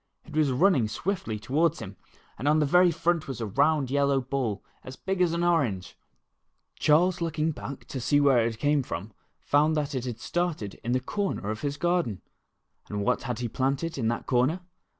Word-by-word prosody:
It - - -11
was 155 -3 +3
running 135 - +3
swiftly 115 - -3
toward 145 +9 +1
him, 95 +1 -8 0.4
and 135 - -2
on 150 +1 +4
the 155 - +3
very 180 +5 +5
front 170 -1 0
was 135 -4 -5
a 115 - -2
round 140 +5 +2
yellow 140 -1 +2
ball, 125 -6 -2 0.2
about - - -21
as 130 - -7
big 190 +4 -2
as 175 -2 +3
an 170 +1 -1
orange! 135 - 0 0.8
Charles 175 +4 +3
looking 160 -1 0
back 140 -2 -8
to 130 - -4
see 145 +4 +3
where 135 -5 +4
it 115 -1 -2
came 145 +3 +2
from, 105 -4 -6 0.3
found 150 +2 +2
that 145 -2 -1
it 125 -3 -4
started 170 - -2
in 120 +1 -1
the 130 - +2
corner 160 - -2
of 110 - -5
his 145 0 -2
garden. 175 - 0 0.7
And 105 -1 -2
what - - +1
had 120 -1 -3
he 120 0 -2
planted 135 +7 -1
in 115 - 0
that 120 +1 -2
corner 135 +8 +1
140 Hz, 195 wpm, -27 LUFS, 120-165 Hz, 0.8 s, very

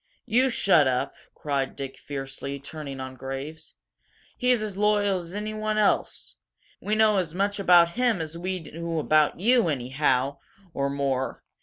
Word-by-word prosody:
"You 250 +3 +3
shut 190 - +4
up!" 130 +2 0 0.2
cried 140 -2 -2
Dick, 135 -1 -7
fiercely, 135 0 -5
turning 140 -1 -7
on 130 0 -6
Graves. 135 +5 -7 0.6
"He's 250 -3 +2
as 210 -3 -4
loyal 205 -1 +2
as 175 +2 -8
anyone 215 0 -2
else! 210 -1 0 0.4
We 210 - -1
know 215 -1 +4
as 175 -3 -1
much 200 +2 0
about 175 -3 +6
him 235 0 +1
as 160 0 -5
we 185 +2 -3
do 165 +1 -5
about 155 0 +2
you, 235 +1 +4
anyhow 135 0 0 0.3
or 140 -1 -1
more! 135 -2 -2
165 Hz, 150 wpm, -26 LUFS, 140-205 Hz, 0.6 s, about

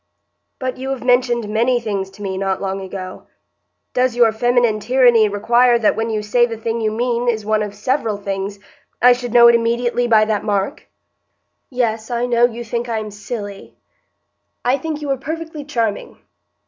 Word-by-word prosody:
"But 255 -1 -4
you 265 +1 -5
have 270 -2 -4
mentioned 245 -3 +2
many 235 +4 +1
things 200 -4 -3
to 195 +2 -12
me 190 -1 -3
not 190 0 -1
long 195 0 -3
ago. 185 -1 -8 0.7
Does 250 -1 +1
your 235 -2 +4
feminine 240 -1 +1
tyranny 240 -2 +4
require 235 +4 +3
that 225 -2 +2
when 225 +1 -2
you 215 -1 -2
say 240 +3 +2
the 230 -1 -6
thing 225 +1 -3
you 215 -1 0
mean 240 +2 -1
is 220 -3 0
one 215 0 +1
of 205 -1 -4
several 225 -1 -1
things, 200 0 -4 0.4
I 250 +1 +7
should 245 -1 -5
know 235 0 +7
it 235 - +7
immediately 235 +1 +1
by 220 -2 +5
that 215 -1 -1
mark?" 205 +4 -2 0.8
"Yes, 225 -4 -2
I 240 0 -1
know 240 -1 +3
you 240 0 -4
think 235 +1 -4
I 225 - -1
am 215 -1 -5
silly." 205 -1 -7 0.9
"I 250 +2 +3
think 305 +1 -4
you 285 - -2
are 270 - 0
perfectly 320 +2 -6
charming." 230 -8 -3
230 Hz, 185 wpm, -19 LUFS, 210-245 Hz, 0.9 s, I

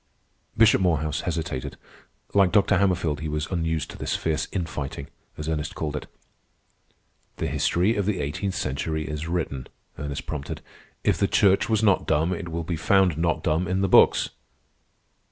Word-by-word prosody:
Bishop 115 -3 +6
Morehouse 80 -4 +1
hesitated. 80 -6 -4 0.6
Like 100 -3 +4
Dr. 100 -3 +4
Hammerfield, 90 -6 +1
he 80 0 -4
was 75 0 -2
unused 80 -3 -1
to - - -11
this - - -1
fierce 80 -2 -1
"infighting," 75 -6 -4 0.3
as 75 0 -5
Ernest 75 -1 -2
called 75 -2 -3
it. 75 - -5 1.3
"The - - -2
history 95 +6 +1
of 100 -2 -1
the 100 -4 0
eighteenth 90 +7 -2
century 80 +2 -2
is 75 +1 -4
written," 80 -7 -2 0.3
Ernest 70 -2 -4
prompted. 70 -2 -5 0.4
"If - - +2
the - - +3
Church 100 +1 +3
was 110 -1 +2
not 100 -3 +3
dumb, 80 +3 +2
it 90 -2 -5
will 85 0 -3
be 85 0 -3
found 95 -1 +3
not 80 0 0
dumb 80 +3 +1
in 95 +2 0
the 95 - +2
books." - - +5
80 Hz, 165 wpm, -25 LUFS, 75-95 Hz, 1.3 s, Bishop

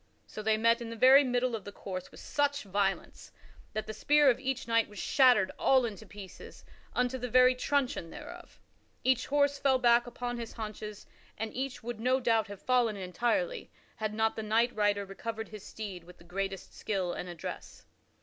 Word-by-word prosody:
So 215 - -8
they 215 0 +2
met 230 +2 +3
in 235 - -5
the 230 - -6
very 260 +4 +7
middle 245 -2 0
of 215 - -6
the 205 - -8
course 185 -2 -7
with - - -14
such 285 -1 0
violence 195 -1 -2 0.4
that 215 - -3
the 215 - -6
spear 295 +5 +4
of 245 - -3
each 265 -2 -3
knight 230 -1 +2
was 205 - -13
shattered 250 -8 +4
all 260 -2 +4
into 220 -1 -7
pieces 200 -2 -11 0.3
unto 250 +1 0
the 250 0 -4
very 255 +2 +6
truncheon 255 -8 -1
thereof. - - -11 0.4
Each 255 -1 +2
horse 285 0 +2
fell 270 -2 +3
back 240 -1 +4
upon 245 0 -4
his 230 -1 -6
haunches, 215 -1 -7 0.3
and 220 0 -4
each 265 -1 -4
would 240 -1 -5
no 255 +3 +2
doubt, 230 -3 +2
have 200 -1 -10
fallen 245 -4 +2
entirely, 240 - -1 0.3
had 215 -1 -3
not 220 0 +1
the - - -3
knight 225 +3 +1
rider 205 -1 +1
recovered 220 +3 -6
his 215 -2 -10
steed 195 -5 -7
with 180 +1 -15
the - - -17
greatest 195 +2 -4
skill 190 -4 -2
and 180 - -5
address. 170 -2 -8
230 Hz, 190 wpm, -30 LUFS, 205-255 Hz, 0.4 s, very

